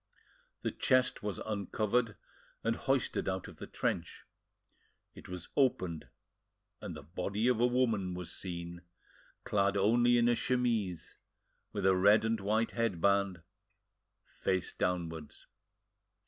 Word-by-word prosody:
The - - 0
chest 130 0 +2
was 105 -1 -3
uncovered 110 +2 -1 0.5
and 115 0 +1
hoisted 135 -6 0
out 95 -1 -3
of - - -12
the - - -8
trench; - - -3 0.9
it - - -13
was 90 -2 -7
opened, 95 - +1 0.7
and - - -6
the - - -10
body 95 +8 -2
of 125 -3 +3
a 120 - +5
woman 115 -7 +1
was 90 -1 -6
seen, 85 -1 -6 0.6
clad 100 0 +1
only 120 +4 +4
in 120 0 +4
a 120 - +4
chemise, 115 -9 -1 0.5
with 100 -2 -3
a 95 -1 +5
red 100 +4 +5
and 110 0 +1
white 110 +3 +1
headband, 100 -4 +1 0.8
face 95 -1 -2
downwards. 80 -4 -3
100 Hz, 125 wpm, -32 LUFS, 90-115 Hz, 0.9 s, a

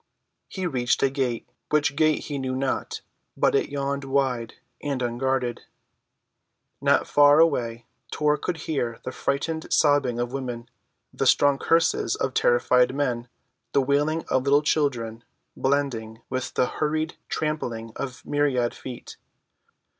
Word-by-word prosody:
He 190 -1 -5
reached 125 -7 0
a 135 - +3
gate—which 135 +2 -1
gate 155 0 +2
he 145 -2 -4
knew 130 -1 -2
not, 130 0 -2 0.4
but - - +3
it - - +1
yawned 140 0 -2
wide 135 -4 -1 0.3
and 140 -2 -2
unguarded. 125 0 -1 1.2
Not - - +3
far 145 +1 +6
away 120 -8 +2 0.2
Tor 150 -1 +2
could 180 -2 -3
hear 120 -7 -2
the 130 - -4
frightened 160 +5 -2
sobbing 145 -5 +3
of 120 +1 -2
women, 125 -3 -4 0.5
the - - 0
strong 145 -1 +4
curses 165 0 +2
of 135 - -2
terrified 125 +1 +3
men, 125 -4 -1 0.5
the 140 - +4
wailing 145 +4 +1
of 130 - +2
little 145 +2 +4
children, 120 -7 0 0.3
blending 125 -5 -1
with 130 0 -3
the - - +3
hurried 155 +4 -2
trampling 120 -8 -3
of 130 -2 -6
myriad 140 -5 +1
feet. 125 -2 -9
135 Hz, 130 wpm, -25 LUFS, 120-145 Hz, 1.2 s, far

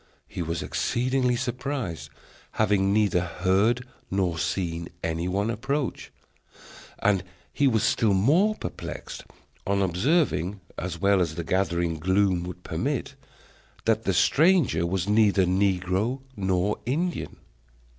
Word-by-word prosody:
He - - -6
was 85 0 -2
exceedingly 125 0 0
surprised, 125 - -3 0.4
having 95 -1 +2
neither 100 -4 +3
heard 95 +7 +1 0.2
nor 90 -4 0
seen 85 0 -2
any 80 +2 -1
one 100 +4 0
approach; 135 +4 -3 0.9
and 95 -3 +2 0.3
he 140 - +3
was 110 -4 +2
still 105 -4 +2
more 165 - +3
perplexed - - -7 0.4
on 100 0 +2
observing, 95 - +1 0.2
as 85 -1 -5
well 100 -1 +3
as 80 -3 -1
the 85 - -3
gathering 85 -2 0
gloom 95 +1 +2
would 90 0 -8
permit, 135 - -2 0.7
that 110 0 +1
the 95 - +2
stranger 145 - +3
was 95 +1 -1
neither 105 -2 +4
negro 95 +6 0
nor 95 0 0
Indian. 170 +7 -2
100 Hz, 120 wpm, -26 LUFS, 90-120 Hz, 0.9 s, neither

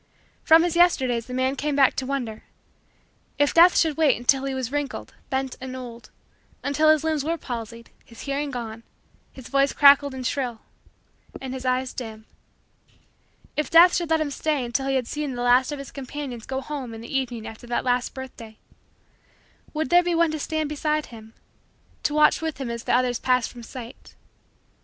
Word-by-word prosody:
From 325 +1 +6
his 350 -1 -1
Yesterdays 260 -10 +3
the 250 - -7
man 260 +1 0
came 290 +1 -2
back 275 -2 +4
to 260 - -2
wonder: 245 -6 -3 1.0
if 290 -1 +2
Death 345 +2 +7
should 315 -3 +2
wait 305 -5 +4
until 265 +3 +2
he 270 -1 -2
was 260 -2 -3
wrinkled, 290 -1 -4 0.2
bent, 265 -1 -2
and 260 0 -6
old 240 -2 -9 0.5
until 305 +2 +2
his 310 -1 +4
limbs 315 -3 0
were 330 +3 -1
palsied, 230 -4 -7
his 230 - -14
hearing 280 +1 -2
gone, 230 -3 -6 0.5
his 260 -3 -11
voice 275 0 +2
cracked 280 -1 +7
and 265 -3 -6
shrill, 245 -3 -2 0.8
and 260 -1 -6
his 260 -1 -6
eyes 255 0 0
dim 220 -3 -7 1.3
if 300 - -1
Death 345 +2 +7
should 345 -2 -1
let 320 0 +3
him 295 -2 -2
stay 295 -2 -1
until 255 +3 -2
he 270 - +1
had 255 -2 0
seen 295 -3 -3
the 245 - -3
last 250 +3 +4
of 295 - -4
his 275 -1 -9
companions 270 -3 -7
go 265 0 -3
home 265 -5 -6
in 225 - -9
the 235 +4 -7
evening 245 -4 -2
after 225 +2 -10
that 240 - -2
last 245 0 0
birthday 235 -4 -9 1.1
would 310 -3 -3
there 350 0 +7
be 350 -1 -1
one 335 -1 +3
to 310 - -4
stand 315 +1 -2
beside 300 +1 -1
him 220 0 -13 0.7
to 295 - -1
watch 305 +1 +4
with 320 -2 -3
him 255 -3 -3
as 235 0 -6
the - - -1
others 245 -1 +1
passed 250 -2 +1
from 240 - -11
sight? 235 +1 -11
265 Hz, 190 wpm, -24 LUFS, 245-300 Hz, 1.3 s, Death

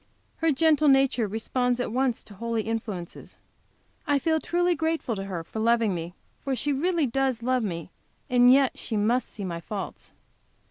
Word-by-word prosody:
Her 325 -1 +2
gentle 305 +1 +3
nature 270 -4 +4
responds 245 +4 -1
at 245 - -2
once 255 0 0
to 210 - -14
holy 230 +2 -2
influences. 215 -6 -5 0.7
I 290 -1 +3
feel 315 +3 +1
truly 350 +2 +1
grateful 320 -6 -1
to 195 -1 -5
her 180 -4 -4
for 220 - -7
loving 230 -2 +2
me, 170 +1 -5 0.3
for 275 -1 -1
she 290 +3 0
really 335 +2 +1
does 260 -1 -1
love 255 +1 +1
me, 170 -4 -4 0.4
and 245 -1 +6
yet 270 0 +3
she 220 - -3
must 230 +5 +1
see 200 - -6
my 170 -2 -4
faults. 200 +3 -7
245 Hz, 175 wpm, -26 LUFS, 215-275 Hz, 0.7 s, and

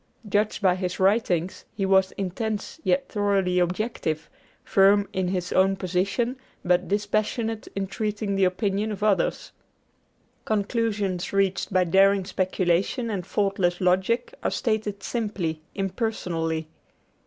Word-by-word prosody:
Judged 210 +1 0
by 185 -2 +5
his 180 -1 -3
writings, 190 -3 +1
he 195 - -1
was 190 0 +4
intense 210 - -3
yet 275 0 +1
thoroughly 200 -4 +1
objective, 175 -3 -2 0.3
firm 200 +1 +4
in 185 -1 0
his 180 -1 -2
own 195 +1 +4
position 195 +7 -1 0.3
but 180 +1 +2
dispassionate 215 +2 -1
in 195 0 -1
treating 210 +1 -2
the 195 0 +2
opinions 200 +3 0
of 205 - -6
others. 210 -3 +1 0.9
Conclusions 205 -3 -1
reached 195 0 +1
by 185 -1 +4
daring 195 +2 +4
speculation 185 +5 0
and 185 -4 -4
faultless 195 -3 0
logic 190 - +1
are - - 0
stated 215 -4 -2
simply, 200 -9 -2
impersonally. 180 -6 -2
195 Hz, 120 wpm, -25 LUFS, 180-210 Hz, 0.9 s, by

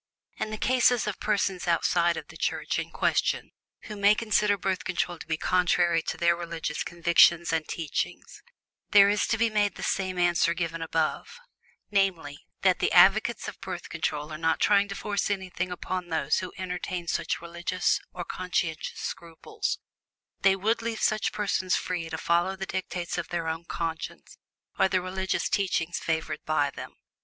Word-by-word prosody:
In - - -2
the 215 - -4
cases 245 -1 +3
of 210 -2 -3
persons 195 -3 0
outside 170 0 +2
of - - -7
the - - -12
Church - - -1
in - - -4
question - - 0 0.3
who 210 - -8
may 205 +1 +5
consider 210 -2 +2
Birth 190 -1 -2
Control 175 -1 -2
to - - -10
be 160 -1 -1
contrary 175 -1 +2
to - - -4
their 170 0 +3
religious 165 -3 -4
convictions 170 0 +4
and 160 -1 0
teachings, 160 -4 -4 0.5
there 200 -1 +7
is 205 0 +1
to 220 - +1
be 230 0 +2
made 205 -1 +1
the - - -7
same 185 -1 -1
answer 175 -1 +3
given 165 -1 -3
above, 165 - -2 0.5
namely, 180 -8 0 0.2
that - - +4
the - - +1
advocates - - +5
of - - -8
Birth - - -6
Control 150 +1 -3
are 155 - -6
not 160 -2 +1
trying 205 -1 +4
to 195 - -6
force 205 0 -1
anything 185 -2 -2
upon 180 0 -4
those 160 -3 +1
who 185 - -5
entertain 180 -1 -4
such - - -1
religious 170 +2 -1
or 175 - -6
conscientious 175 -3 -2
scruples 165 -1 -4 0.6
they 195 0 +5
would 220 +4 0
leave 225 -1 -3
such 215 0 +1
persons 195 -3 0
free 170 -3 -3
to 160 - -4
follow 175 +4 +1
the 190 0 -5
dictates 180 -2 -3
of - - -4
their 170 -1 -2
own 160 +1 -3
conscience 165 -1 -5 0.4
or - - +5
the 190 0 +1
religious 190 +1 -2
teachings 175 -4 0
favored 160 -2 -2
by 145 -2 +1
them. - - -9
180 Hz, 170 wpm, -27 LUFS, 165-195 Hz, 0.6 s, there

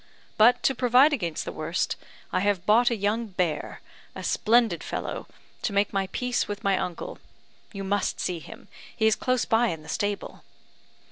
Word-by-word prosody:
But, 230 +3 +5
to 270 - +3
provide 255 +4 +5
against 170 - -2
the - - -4
worst, 160 +3 -2 0.4
I - - +2
have 195 -2 0
bought 230 +4 +5
a 235 - 0
young 215 +3 -1
bear, 180 -6 -2 0.3
a - - -6
splendid 230 +1 +2
fellow, - - -4 0.3
to 210 - -2
make 200 +1 +1
my 195 -1 0
peace 250 -1 -1
with 205 0 -5
my 195 -1 +3
uncle. 180 -2 -4 0.5
You 195 -3 -6
must 195 0 -1
see 180 -2 -2
him; 225 +7 -12 0.3
he 220 - +2
is 220 - +5
close 255 -1 0
by 230 +2 +3
in 160 -6 -4
the - - -14
stable." 205 0 -3
205 Hz, 180 wpm, -26 LUFS, 190-235 Hz, 0.5 s, But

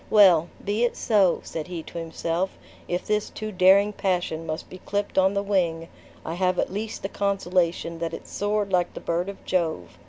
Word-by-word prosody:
"Well! 180 -6 +6 0.2
be 205 +3 +1
it 240 - +1
so!" 200 -6 +3
said 160 -2 -5
he 175 -3 -5
to 170 - -7
himself, 165 +2 -2 0.3
"if 175 +1 -2
this 210 0 0
too 215 0 -5
daring 195 +2 +5
passion 175 -5 -1
must 155 0 -4
be 185 - -11
clipped 205 0 -1
on 190 +1 +3
the 200 - +1
wing, 170 -5 0 0.4
I 165 - -3
have 185 +1 +1
at - - -1
least 215 +2 -4
the - - 0
consolation 180 -4 0
that 165 -1 -2
it - - -11
soared 205 -1 -1
like 175 -1 +1
the - - -5
bird 175 +3 -1
of 200 - -10
Jove! 160 - -1
185 Hz, 195 wpm, -25 LUFS, 170-200 Hz, 0.4 s, Well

